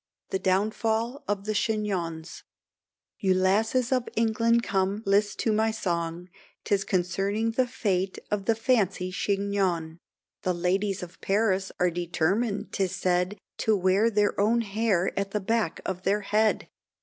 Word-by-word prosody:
THE 190 Hz, -, 0 dB
DOWNFALL 220 Hz, +7 st, 0 dB
OF 205 Hz, -1 st, -1 dB
CHIGNONS. 190 Hz, -7 st, -2 dB, 0.8 s
You 190 Hz, -2 st, +2 dB
lasses 220 Hz, +7 st, +2 dB
of 255 Hz, -2 st, +1 dB, 0.5 s
come 195 Hz, +2 st, 0 dB
list 200 Hz, +1 st, +2 dB
to 220 Hz, -, +1 dB
my 220 Hz, +1 st, +2 dB
song, 170 Hz, -4 st, -2 dB, 0.4 s
'Tis 200 Hz, -3 st, +1 dB
concerning 195 Hz, +4 st, 0 dB
the 250 Hz, +2 st, +1 dB
fate 195 Hz, -7 st, -1 dB
of 205 Hz, -2 st, -1 dB
the 225 Hz, -, +3 dB
fancy 200 Hz, -6 st, +1 dB
chignon; 195 Hz, -5 st, -1 dB, 0.4 s
The 180 Hz, -1 st, 0 dB
ladies 190 Hz, +2 st, 0 dB
of 180 Hz, 0 st, -11 dB
Paris 195 Hz, -2 st, +1 dB
are 180 Hz, 0 st, +3 dB
determined 175 Hz, +6 st, -1 dB
'tis 190 Hz, -2 st, -1 dB
said, 180 Hz, +3 st, 0 dB, 0.2 s
To 220 Hz, -1 st, +2 dB
wear 190 Hz, +4 st, +3 dB
their 205 Hz, -2 st, +1 dB
own 230 Hz, +3 st, +3 dB
hair 200 Hz, -3 st, 0 dB
at 200 Hz, 0 st, -1 dB
the 210 Hz, -, -1 dB
back 210 Hz, -3 st, -1 dB
of 185 Hz, -1 st, -3 dB
their 200 Hz, +2 st, +1 dB
head. 210 Hz, +2 st, +1 dB
200 Hz, 135 wpm, -27 LUFS, 185-220 Hz, 0.8 s, the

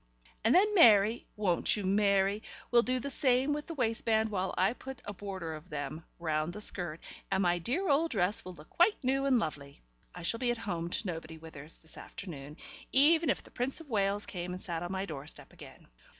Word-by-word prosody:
And 225 Hz, +3 st, +4 dB
then 415 Hz, +3 st, +5 dB
Mary 225 Hz, -, +6 dB
won't 200 Hz, -1 st, +1 dB
you, 205 Hz, -, -3 dB
Mary? 200 Hz, +1 st, +2 dB, 0.3 s
will 240 Hz, -1 st, +6 dB
do 255 Hz, +2 st, 0 dB
the 280 Hz, +3 st, -3 dB
same 265 Hz, +1 st, +2 dB
with 295 Hz, 0 st, -4 dB
the 330 Hz, -, -6 dB
waistband 225 Hz, -3 st, +1 dB
while 190 Hz, -2 st, -1 dB
I 190 Hz, +5 st, +3 dB
put 265 Hz, +1 st, -9 dB
a 205 Hz, -, -5 dB
border 190 Hz, -4 st, -5 dB
of 155 Hz, 0 st, -10 dB
them 150 Hz, +2 st, -5 dB
round 155 Hz, 0 st, -1 dB
the 210 Hz, -, -7 dB
skirt, 175 Hz, -6 st, +1 dB, 0.3 s
and 190 Hz, -, +1 dB
my 175 Hz, -1 st, +2 dB
dear 270 Hz, -, -1 dB
old 315 Hz, +3 st, +3 dB
dress 200 Hz, -, +1 dB
will 185 Hz, 0 st, -9 dB
look 150 Hz, 0 st, -15 dB
quite 355 Hz, -1 st, +3 dB
new 270 Hz, +2 st, +1 dB
and 265 Hz, -2 st, +4 dB
lovely. 145 Hz, -, -4 dB, 0.3 s
I 180 Hz, -, -8 dB
shall 230 Hz, +7 st, 0 dB
be 245 Hz, -1 st, +1 dB
at 240 Hz, -, 0 dB
home 175 Hz, -7 st, -3 dB
to 210 Hz, -, -2 dB
nobody, 165 Hz, -3 st, -5 dB
Withers, 160 Hz, -1 st, -7 dB
this 160 Hz, -, -11 dB
afternoon, 150 Hz, -5 st, -8 dB, 0.3 s
even 320 Hz, +4 st, +5 dB
if -, -, 0 dB
the -, -, -17 dB
Prince 255 Hz, +4 st, 0 dB
of 310 Hz, -5 st, -13 dB
Wales 200 Hz, -1 st, +1 dB
came 180 Hz, -1 st, -5 dB
and 180 Hz, -, -6 dB
sat 170 Hz, -3 st, -4 dB
on 175 Hz, +1 st, -4 dB
my 190 Hz, 0 st, -2 dB
doorstep 150 Hz, -3 st, -8 dB
again. -, -, -14 dB
200 Hz, 210 wpm, -31 LUFS, 170-250 Hz, 0.3 s, Mary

